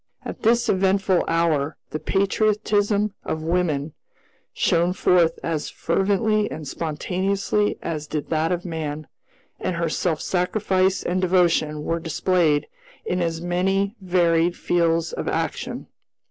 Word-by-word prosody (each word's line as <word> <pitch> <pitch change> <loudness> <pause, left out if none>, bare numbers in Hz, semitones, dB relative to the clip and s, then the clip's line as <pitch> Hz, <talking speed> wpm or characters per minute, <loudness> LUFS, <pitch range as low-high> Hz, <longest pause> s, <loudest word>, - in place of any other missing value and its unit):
At - - -6
this 235 +1 +3
eventful 190 -1 +2
hour 160 -3 +1
the 155 - -3
patriotism 205 +2 +1
of 155 0 -3
woman 160 -3 0 0.6
shone 170 +2 +2
forth 175 -3 +3
as 160 -3 -2
fervently 205 +4 +1
and 155 -2 -7
spontaneously 190 +7 -1
as 155 -2 -4
did 150 +1 -4
that 160 +1 +1
of 175 0 -2
man; 155 -3 -4 0.5
and 180 - -2
her 170 -1 -1
self 160 -1 -1
sacrifice 190 0 +1
and 185 +1 -1
devotion 170 -5 +2
were 165 +2 -1
displayed 165 -2 +1 0.4
in 180 0 -1
as 165 -1 -1
many 190 +4 0
varied 175 -2 +2
fields 165 -1 +1
of - - -4
action. - - -3
175 Hz, 125 wpm, -23 LUFS, 160-190 Hz, 0.6 s, this